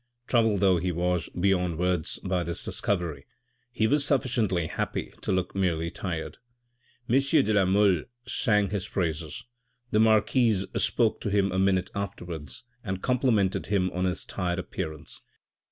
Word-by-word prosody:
Troubled 115 -5 +2
though 95 -2 +5
he 90 +2 -1
was 90 0 -1
beyond 90 -3 +2
words 90 -2 0
by 90 -1 0
this 85 0 -4
discovery, 85 -8 -2 0.4
he 110 - +1
was 140 +5 +3
sufficiently 120 - +1
happy - - -3
to - - -2
look 95 -1 0
merely 85 -4 0
tired. 85 -4 -4 0.7
M. 130 +4 +4
de 135 -6 +2
la 100 -2 +4
Mole 95 -3 +3 0.2
sang 105 -4 +1
his 100 -1 -2
praises. 80 -4 -3 0.5
The 105 - +3
marquise 110 -1 +3
spoke 115 -3 +1
to - - -2
him 100 -1 +2
a 95 - 0
minute 95 -1 +2
afterwards 90 -8 -6 0.2
and 95 -3 -4
complimented 120 -7 +1
him 95 -3 +1
on 90 +1 -1
his 90 0 -2
tired 90 -2 -2
appearance. 80 -4 -5
95 Hz, 150 wpm, -27 LUFS, 90-105 Hz, 0.7 s, though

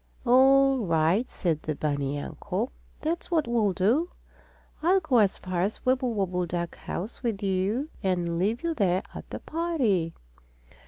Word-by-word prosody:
"All 270 +2 +5
right," 170 +3 +2
said 165 -5 -1
the 155 - -3
bunny 145 -1 -1
uncle. - - -3 0.3
"That's 330 +2 -2
what 325 -6 +1
we'll 225 -4 +2
do. 230 - +2 0.7
I'll 365 +4 +4
go 255 -9 +2
as 200 -3 +3
far 185 -2 -3
as 200 +4 0
the - - -27
Wibblewobble 200 -9 0
duck 170 0 -3
house 200 +7 -5
with 225 -5 -2
you 195 +8 0
and 175 -4 0
leave 215 - 0
you 335 -1 0
there 190 - +1
at - - -9
the - - -5
party." 255 - 0
205 Hz, 155 wpm, -27 LUFS, 175-260 Hz, 0.7 s, All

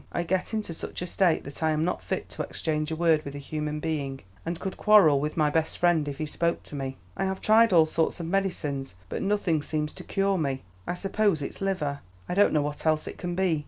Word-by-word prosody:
I 175 - -1
get 185 +2 -1
into 210 -6 -2
such 165 - -6
a - - -2
state 175 -1 +2
that 140 +3 -9
I 160 - +3
am 155 +1 +1
not 180 - -1
fit - - -3
to - - -5
exchange 155 -1 -2
a 160 - -2
word 160 -2 +3
with 140 -1 -7
a - - -4
human 150 +1 -3
being, 145 -4 -3 0.2
and 170 0 -3
could 190 - -4
quarrel 200 -10 +6
with 150 +3 -3
my 150 -2 +3
best 160 +1 0
friend 170 -4 +3
if 140 -1 -4
he 155 - -2
spoke 170 +3 -1
to - - -9
me. 135 -1 -4 0.2
I - - -1
have 190 0 -2
tried 225 +1 +5
all 165 -3 +7
sorts 160 +2 0
of 170 - -3
medicines, 165 - -1
but - - -3
nothing 195 -6 +1
seems 150 0 -2
to - - -10
cure 195 -1 +1
me. 135 -4 -1 0.2
I 175 - -1
suppose 195 -4 +1
it's - - -6
liver; 175 -8 -1 0.3
I - - -2
don't 205 +3 +5
know 150 -2 +2
what 150 0 -4
else 155 -1 +2
it - - -7
can 175 -1 -3
be. 180 -4 +2
160 Hz, 245 wpm, -27 LUFS, 150-185 Hz, 0.3 s, all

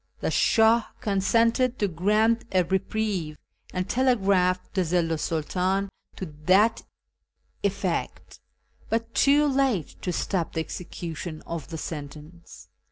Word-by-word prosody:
The - - -1
Shah 225 +1 +4
consented 230 +4 +2
to 205 - +1
grant 210 +7 +2
a 185 -1 +3
reprieve, 190 -3 -2 0.3
and 185 0 -2
telegraphed 200 -8 +2
to 190 -2 +1
the 175 +1 -2
Zillu 165 -2 +2
's 155 - -3
Snltdn 185 +5 0 0.3
to 190 - -5 0.2
that 205 +5 +4 0.8
effect, 195 -3 -3 0.5
but 230 0 -1
too 290 +2 +4
late 265 - 0
to 180 - -2
stop 175 0 -2
the 160 - -1
execution 165 -1 -6
of 165 -2 -5
the 165 - -6
sentence. 150 - -9
190 Hz, 125 wpm, -26 LUFS, 170-220 Hz, 0.8 s, Shah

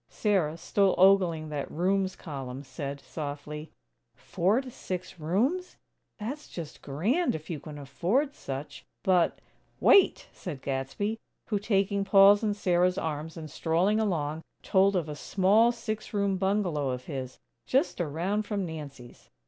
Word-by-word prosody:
Sarah, 185 -7 +1
still 195 +3 +2
ogling 180 -5 +4
that 145 -2 -4
"rooms" 190 +2 0
column 135 -3 -7
said, 140 +1 -6
softly: 150 +1 -6 0.5
"Four 195 +8 +1
to 260 -2 -9
six 185 -4 -6
rooms? 245 - 0 0.4
That's 270 +8 -6
just 160 -3 -8
grand 210 - 0
if 155 +2 -7
you 155 - -3
can 150 0 -9
afford 185 - 0
such. 135 - -7 0.2
But, 180 -3 +3 0.2
" - - -39
"Wait!" 395 - +5
said 150 -8 -7
Gadsby, 140 +12 -2 0.3
who, 210 -3 +1
taking 200 -1 +1
Paul's 195 +1 +7
and 210 -2 0
Sarah's 180 -1 +2
arms, 160 0 -3
and 160 -1 -6
strolling 175 +8 +1
along, 160 -7 -1 0.2
told 195 +1 +3
of 170 -4 0
a 150 - -5
small 205 +9 +3
six 215 -2 -5
room 200 -1 +1
bungalow 185 -7 0
of 125 0 -4
his, 130 -4 -5 0.3
just 270 - +1
around 175 +7 -1
from 200 -3 -1
Nancy's. 145 -7 -9
180 Hz, 145 wpm, -28 LUFS, 150-205 Hz, 0.5 s, Paul's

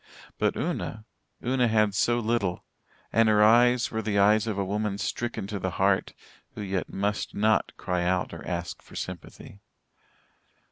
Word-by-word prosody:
But - - +1
Una 110 0 -3 0.4
Una 125 0 +2
had 110 -2 +2
so 120 +5 +2
little 110 -6 -1 0.5
and 115 -1 +4
her 105 0 +5
eyes 120 +2 +5
were 110 - -2
the 105 -2 -1
eyes 105 +2 +4
of 105 -3 -2
a 100 - 0
woman 105 +1 -2
stricken 115 0 -3
to 100 0 -4
the - - -1
heart, - - +1 0.4
who - - -6
yet 95 -2 -2
must 100 +1 -2
not 110 +1 +2
cry 90 -1 -1
out 90 0 0
or - - -8
ask - - -4
for - - -16
sympathy. 90 +2 -8
105 Hz, 160 wpm, -27 LUFS, 100-110 Hz, 0.5 s, her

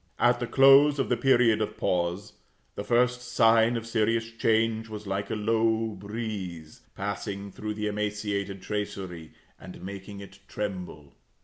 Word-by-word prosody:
At 120 0 +3
the 120 - -3
close 135 +4 +6
of 135 - -1
the 125 - +3
period 120 -4 +3
of 105 - -3
pause, 90 +4 -1 0.4
the 100 - -5
first 125 +3 +2
sign 115 -1 +3
of 115 - -5
serious 115 0 0
change 115 0 +1
was 105 -1 -7
like 100 +1 -3
a - - -2
low 110 +1 +1
breeze, 100 -6 -6
passing 100 0 -4
through 105 +1 -5
the 105 0 -3
emaciated 105 -2 -3
tracery, 95 -5 -5 0.3
and 90 -2 -11
making 100 +1 -8
it 100 0 -12
tremble. 90 -8 -6
105 Hz, 145 wpm, -27 LUFS, 100-115 Hz, 0.4 s, close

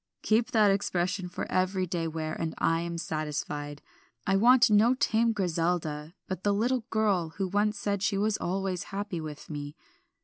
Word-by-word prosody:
"Keep 225 +2 +2
that 215 -3 +4
expression 185 -2 -1
for 180 - -4
every 185 0 +1
day 170 -2 -2
wear, 155 -1 -3
and 165 -1 -3
I 165 0 +2
am 170 0 -4
satisfied. 150 -2 -4 0.4
I 195 - +2
want 235 +3 +6
no 220 +5 +5
tame 230 -2 +2
Griselda, 165 -4 -1
but 185 0 -5
the 205 -1 +2
little 240 +2 0
girl 205 -7 +1
who 195 -2 0
once 205 +2 +1
said 200 -1 -1
she 195 0 +1
was 210 +1 +1
always 190 0 -2
happy 195 -3 -4
with 150 -2 -8
me. 145 -1 -6
185 Hz, 170 wpm, -29 LUFS, 165-210 Hz, 0.4 s, want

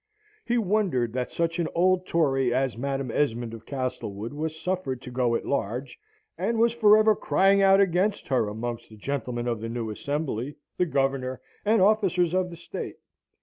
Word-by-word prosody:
He 240 +1 0
wondered 190 - +1
that 125 -1 -2
such 165 +1 -1
an 170 - +1
old 185 +1 +2
Tory 135 -6 +2
as 130 0 0
Madam 135 0 -2
Esmond 120 -4 0
of 115 -1 -10
Castlewood 125 -4 -4
was 160 +1 -4
suffered 180 -9 -2
to 125 - -8
go 125 -2 +1
at - - -2
large, 125 0 -3 0.4
and 220 +6 0
was 230 +1 +3
for 215 -3 +6
ever 215 0 +5
crying 195 0 +3
out 195 0 +6
against 195 +2 +1
her 130 -5 +2
amongst 120 +2 -5
the 110 - -14
gentlemen 125 0 -3
of 115 -3 -2
the 115 - -4
new 115 -2 -3
Assembly, 140 +1 -3 0.2
the 180 - +2
Governor, 135 -2 0 0.2
and 210 -2 +4
officers 185 -5 +3
of 185 -1 +1
the 170 - -9
State. 170 - -6
140 Hz, 180 wpm, -26 LUFS, 120-185 Hz, 0.4 s, for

